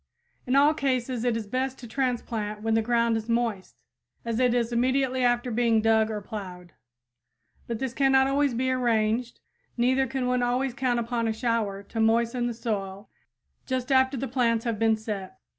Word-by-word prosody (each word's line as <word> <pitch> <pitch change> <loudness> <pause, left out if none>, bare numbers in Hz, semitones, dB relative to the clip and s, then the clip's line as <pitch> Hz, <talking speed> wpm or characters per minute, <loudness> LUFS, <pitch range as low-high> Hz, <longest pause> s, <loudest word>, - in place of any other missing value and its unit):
In 255 - +1
all 290 +2 +5
cases 255 -4 -1
it 240 -2 +1
is 225 - -5
best 260 +5 -2
to 245 - -10
transplant 225 -4 -2
when 225 0 +1
the 225 - +3
ground 235 0 +1
is 220 +1 -6
moist, 230 -5 -1 0.5
as 230 0 -1
it 250 -1 +3
is 235 -1 0
immediately 260 +1 +1
after 245 0 +1
being 230 -1 +2
dug 220 0 +3
or 210 -1 -4
plowed. 180 -4 -8 0.9
But 235 - -3
this 260 0 -3
cannot 270 -1 +4
always 275 -1 +1
be 260 +2 0
arranged, 235 -1 0 0.4
neither 260 +2 +2
can 265 0 -2
one 250 0 +1
always 250 +1 0
count 250 -2 0
upon 235 0 -1
a 220 - 0
shower 220 -4 -1
to 225 +3 -6
moisten 235 +2 +2
the 240 - -4
soil 200 -3 -4 0.6
just 260 0 -2
after 260 0 +3
the 270 +3 -3
plants 230 -2 +1
have 230 -3 -2
been 225 -1 +3
set. 210 -4 -6
235 Hz, 180 wpm, -26 LUFS, 225-255 Hz, 0.9 s, all